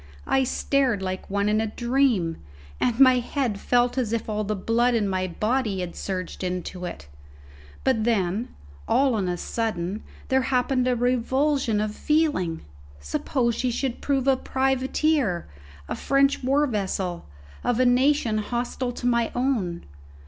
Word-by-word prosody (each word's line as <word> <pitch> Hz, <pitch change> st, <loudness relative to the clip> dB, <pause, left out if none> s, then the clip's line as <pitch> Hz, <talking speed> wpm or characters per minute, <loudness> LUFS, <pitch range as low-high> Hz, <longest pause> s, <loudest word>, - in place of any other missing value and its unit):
I 265 Hz, -, +2 dB
stared 255 Hz, -5 st, +1 dB
like 185 Hz, 0 st, -4 dB
one 200 Hz, +1 st, 0 dB
in 215 Hz, +1 st, +2 dB
a 220 Hz, -, -1 dB
dream, 235 Hz, -7 st, +1 dB, 0.4 s
and 245 Hz, 0 st, 0 dB
my 255 Hz, -2 st, +7 dB
head 245 Hz, -4 st, -2 dB
felt 245 Hz, +3 st, +2 dB
as 235 Hz, -4 st, -1 dB
if 230 Hz, -1 st, -2 dB
all 215 Hz, -1 st, -1 dB
the 210 Hz, +1 st, -2 dB
blood 235 Hz, +5 st, +1 dB
in 215 Hz, -3 st, +1 dB
my 185 Hz, -1 st, -1 dB
body 215 Hz, +1 st, -1 dB
had 175 Hz, -1 st, -5 dB
surged 185 Hz, -1 st, -4 dB
into 180 Hz, 0 st, -4 dB
it. 170 Hz, -, -7 dB, 0.8 s
But 255 Hz, -5 st, +2 dB
then, 215 Hz, -1 st, 0 dB, 0.4 s
all 270 Hz, -1 st, +3 dB
on 195 Hz, -5 st, 0 dB
a 175 Hz, -, -1 dB
sudden, 210 Hz, -2 st, -3 dB, 0.3 s
there 265 Hz, 0 st, +3 dB
happened 255 Hz, 0 st, +1 dB
a 250 Hz, -, +2 dB
revulsion 250 Hz, 0 st, +1 dB
of 210 Hz, 0 st, -1 dB
feeling. 290 Hz, -, 0 dB, 0.4 s
Suppose 235 Hz, -, -1 dB
she 255 Hz, -, -1 dB
should 245 Hz, +1 st, -2 dB
prove 275 Hz, -2 st, 0 dB
a 270 Hz, -, +5 dB
privateer 265 Hz, -, 0 dB, 0.4 s
a -, -, -3 dB
French 275 Hz, 0 st, +2 dB
war 275 Hz, +3 st, +3 dB
vessel 190 Hz, -7 st, -2 dB, 0.4 s
of 245 Hz, -1 st, +1 dB
a 255 Hz, -, +4 dB
nation 250 Hz, -3 st, +3 dB
hostile 245 Hz, +3 st, -3 dB
to 240 Hz, -, -7 dB
my 235 Hz, -2 st, +2 dB
own? 235 Hz, -10 st, -1 dB
235 Hz, 155 wpm, -25 LUFS, 200-260 Hz, 0.8 s, my